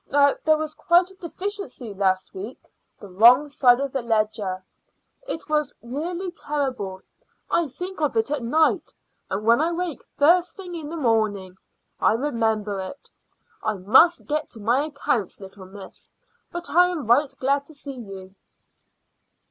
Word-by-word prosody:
Now 285 0 +4
there 310 0 +4
was 310 0 -3
quite 350 +4 +3
a - - -17
deficiency 365 - -6
last 190 -1 0
week 205 +7 -9 0.3
the 205 - -10
wrong 235 +9 +6
side 250 -3 +4
of 275 -1 -2
the 270 - -2
ledger. 215 -5 -1 0.6
It 325 - -4
was 300 -2 0
really 340 +9 -4
terrible. 255 - -3 0.5
I 340 -2 +2
think 360 +6 -7
of 295 -6 0
it 225 +5 +1
at 295 -3 -1
night, 310 +7 +1 0.3
and 200 +3 -3
when 235 +5 +5
I 330 +2 +1
wake 345 -3 -3 0.2
first 340 +4 +4
thing 365 -3 -8
in 320 -3 -6
the 335 - -5
morning 215 - 0 0.4
I - - +4
remember 220 -6 -1
it. 190 +9 -8 0.5
I 215 - 0
must 260 - +4
get 305 +1 -2
to 225 - -9
my 240 +7 +1
accounts, 280 - -2
little 195 -1 -11
miss, 195 0 -12 0.4
but 345 0 -4
I 355 +2 +6
am 330 -7 -4
right 265 +5 +3
glad 280 +2 0
to 315 - -11
see 285 -1 -7
you." 195 -6 -10
270 Hz, 160 wpm, -24 LUFS, 215-315 Hz, 0.6 s, wrong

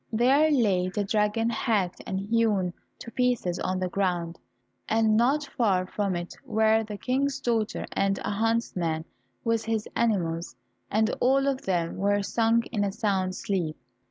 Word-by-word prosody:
There 265 +7 +4
lay 200 -10 +2
the 205 +2 -1
dragon 210 +3 +1
hacked 200 -6 0
and 190 0 -2
hewn 205 -3 +1 0.2
to 230 - -9
pieces 240 -9 0
on 185 0 -1
the 185 0 -1
ground, 175 -3 -1 0.5
and 220 -1 +3
not 270 +6 +2
far 195 -8 +2
from 195 0 -2
it 175 0 -5
were 220 0 +2
the 210 -1 -7
King's 270 +4 0
daughter 230 -5 -1
and 195 0 +1
a - - -1
huntsman 200 -7 0 0.4
with 230 -1 0
his 220 -1 -1
animals, 175 -8 0 0.3
and 215 +1 +2
all 270 +2 +3
of 275 -1 0
them 170 -3 0
were 200 +1 +1
sunk 230 +2 +2
in 210 -4 0
a 200 - 0
sound 195 -4 -1
sleep. 175 -7 -2
210 Hz, 155 wpm, -27 LUFS, 185-230 Hz, 0.5 s, There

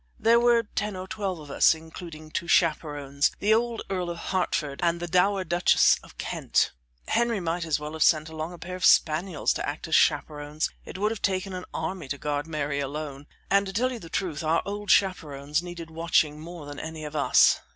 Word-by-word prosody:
There 230 +1 +5
were 235 -1 +4
ten 210 -1 -3
or 185 0 -6
twelve 195 -3 -3
of 150 -2 -10
us, 160 - +5
including 160 -1 -10
two 170 - -3
chaperons, 145 -5 +2
the 210 +2 +3
old 235 +1 0
Earl 185 -2 -2
of 170 - -4
Hertford 170 -6 -1
and 170 0 +1
the 175 - -3
dowager 185 +2 +2
Duchess 175 +1 +4
of - - -17
Kent. - - 0 0.4
Henry 235 -3 +1
might 170 0 -2
as 155 -2 0
well 150 +1 -6
have 160 - -7
sent 155 -1 +4
along 160 +1 -5
a 175 - -9
pair 180 +2 -7
of 185 - -7
spaniels 160 +3 +3
to - - -3
act - - -6
as - - -5
chaperons 150 +1 +1
it - - -8
would 210 +3 +1
have 225 - -5
taken 190 0 -1
an 185 0 -5
army 160 -1 -4
to 145 - -3
guard 145 +2 -2
Mary 145 -3 -2
alone 145 0 -5 0.2
and 200 0 +4
to 190 - -6
tell 250 +5 +1
you 245 - -5
the 165 - -11
truth 165 -5 -2
our 160 +1 +2
old 205 0 -5
chaperons 150 -5 +1
needed 175 -2 -8
watching 160 -2 +1
more 165 -1 -9
than 145 0 -8
any 160 -1 -6
of 150 0 -7
us. 145 - +5
170 Hz, 210 wpm, -26 LUFS, 150-190 Hz, 0.4 s, There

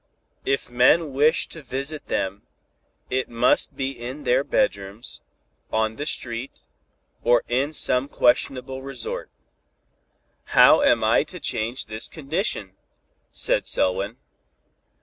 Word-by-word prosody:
If 135 - 0
men 135 +5 +4
wish 150 +4 +3
to 160 - -9
visit 140 +3 -5
them, 100 +2 -2 0.7
it 130 0 -1
must 120 +1 +2
needs 135 0 -4
be - - -9
in 130 +5 -6
their 125 +1 +2
bedrooms, 100 - -2 0.5
on 110 0 0
the 145 - -4
street, 120 -2 -3 0.6
or 120 0 +3
in 130 +5 0
some 130 -3 +3
questionable 130 +1 +1
resort." 135 -3 -5 1.3
"How - - +8
am - - +3
I - - +4
to - - -9
change 115 +4 -2
this 110 +1 -6
condition?" 155 - -3 0.6
said - - 0
Selwyn. 100 +5 0
125 Hz, 120 wpm, -24 LUFS, 115-135 Hz, 1.3 s, How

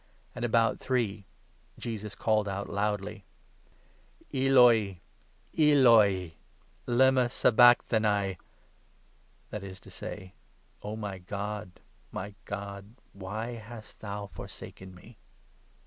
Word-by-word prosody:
And 125 - -7
46 - - +1
about 115 -1 +2
three 110 -6 -1 0.5
Jesus 105 -3 -5
called 110 -2 +1
out 100 0 -3
loudly: 105 0 -2 0.6
" - - -32
Eloi, 125 -8 +5 0.6
Eloi, 115 - +5 0.5
lema 130 0 +4
sabacthani 110 -6 +4 0.4
" - - -36
— - - -36
that 105 -2 -5
is 95 -1 -9
to - - -14
say, 95 0 -8 0.2
' - - -37
O 105 +1 -5
my 100 -3 -5
God, 105 +1 -6 0.3
my 100 +1 -6
God, 100 +2 -7 0.2
why 100 +5 -5
hast 110 -1 -10
thou 105 -1 -5
forsaken 95 -2 -10
me 105 +5 -16
105 Hz, 115 wpm, -29 LUFS, 100-120 Hz, 0.6 s, Eloi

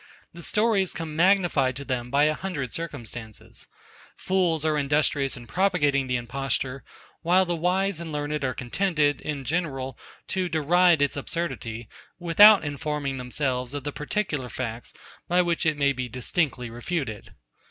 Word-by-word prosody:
The 170 - -10
stories 210 -2 +1
come 160 -2 -6
magnified 170 -7 +3
to 140 +2 -6
them 125 -3 -3
by 140 +3 +3
a 155 +1 +3
hundred 150 -7 -4
circumstances. 120 - -7 0.5
Fools 175 -5 0
are 155 -1 +2
industrious 145 -2 +1
in 120 - -10
propagating 145 -7 +1
the 125 - 0
imposture; 130 +2 -2 0.4
while 180 +3 +4
the 175 -1 -1
wise 180 +2 0
and 170 -2 -6
learned 150 0 -2
are 130 -2 -1
contented, 150 +2 0
in 145 -3 -4
general, 135 -4 -2 0.3
to 185 -2 -1
deride 170 0 +4
its 145 - 0
absurdity, 130 -7 -4 0.3
without 190 +2 +7
informing 145 -1 -3
themselves 125 0 -2
of 145 - -4
the 145 - -3
particular 150 -4 -3
facts, 115 -1 -5 0.4
by 180 +1 +3
which 170 -2 0
it 155 -1 +1
may 140 -1 +3
be 130 -1 -4
distinctly 125 0 -1
refuted. 120 -2 -4
150 Hz, 150 wpm, -26 LUFS, 130-175 Hz, 0.5 s, without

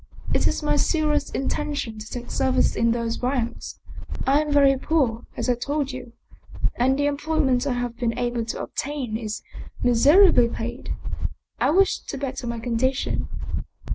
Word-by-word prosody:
It - - +3
is - - -2
my 295 0 +2
serious 300 -2 +1
intention 270 -4 -2
to 215 - -8
take 245 -1 -6
service 260 -1 +2
in 230 +1 +2
those 230 -1 -2
ranks. 245 -2 -2 0.5
I 280 +3 +4
am 300 -1 -3
very 280 -1 +5
poor 260 -5 0
as - - -2
I 250 - +4
told 280 +3 -2
you, 255 -2 -8 0.6
and 260 +2 +2
the 285 - +1
employment 285 -3 +1
I 265 - +1
have 245 -1 -3
been 235 -2 -1
able 240 -1 -1
to 230 - -4
obtain 270 -6 -3
is 215 -2 -4 0.4
miserably 245 - +6
paid. 240 +2 -5 0.6
I - - +3
wish 385 +4 +4
to 280 - -6
better 265 -2 -4
my 235 0 -2
condition." 245 +3 -1
260 Hz, 160 wpm, -24 LUFS, 235-290 Hz, 0.6 s, miserably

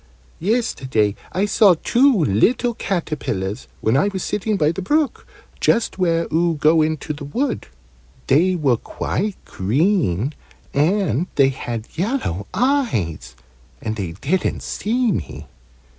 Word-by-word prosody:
"Yesterday 135 - 0 0.2
I 190 +3 +1
saw 205 -3 +5
two 240 - +3
little 235 - +2
caterpillars, 150 - -3
when 110 +3 +2
I 145 +8 +3
was 190 -2 -3
sitting 210 0 -1
by 155 -3 +3
the 170 - -5
brook, 295 - 0 0.3
just 230 -4 +1
where 165 -2 +2
oo 170 0 +2
go 155 +2 +4
into 155 0 -1
the 145 0 -8
wood. 245 - -2 0.6
They 175 +7 +3
were 140 -8 +2
quite 205 - -3
green, 135 - +1 0.4
and 175 - +1
they 135 -2 +5
had 120 -4 -5
yellow 175 - -2
eyes, 185 - 0 0.4
and 110 -1 -3
they 95 -6 -4
didn't 150 - -1
see 235 +2 0
me. 85 - -4
165 Hz, 130 wpm, -21 LUFS, 130-210 Hz, 0.6 s, saw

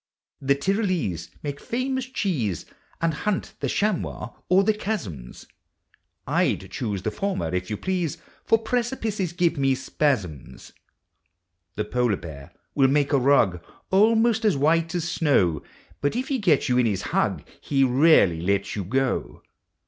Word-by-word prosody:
The 140 0 +2
Tvrolese 170 - -1
make 145 -1 -4
famous 260 +2 -2
cheese 155 - -2 0.4
And 165 -1 +2
hunt 200 +6 -2
(he - - 0
chamois 190 - -1 0.2
o'er 190 +2 +5
the 215 +2 +3
chaz 210 - -3
zums; 65 -8 -10 0.8
J - - +2
\1 95 0 -13
choose 105 -5 -3
the 110 - -1
former 195 - -2
if 90 +1 -2
yon 105 - -2
please. 180 - -2 0.3
For 225 - +4
precipices 225 -5 -2
jjivo 170 -2 +1
me 135 -1 +2
spaz 130 -3 0
zums. 75 -6 -12 1.0
The 105 - -2
polar 120 -2 +1
bear 70 -4 -10 0.2
will 135 -2 +4
make 145 +2 +1
a 140 - +5
rug 115 -10 +3 0.3
Almost 225 +3 +4
as 205 -9 +3
white 165 +4 +2
as 170 -1 -1
snow; 100 - +2 0.4
But 145 - 0
if 255 +4 -2
he 270 -2 0
gets 175 -9 +2
you 125 -1 +2
in 120 - +3
his 100 -4 -1
hug, - - +1 0.2
He 135 -2 +1
rarely 130 - +4
lets 100 +2 0
you 100 - -2
go. 130 +7 -1
145 Hz, 155 wpm, -24 LUFS, -, 1.0 s, o'er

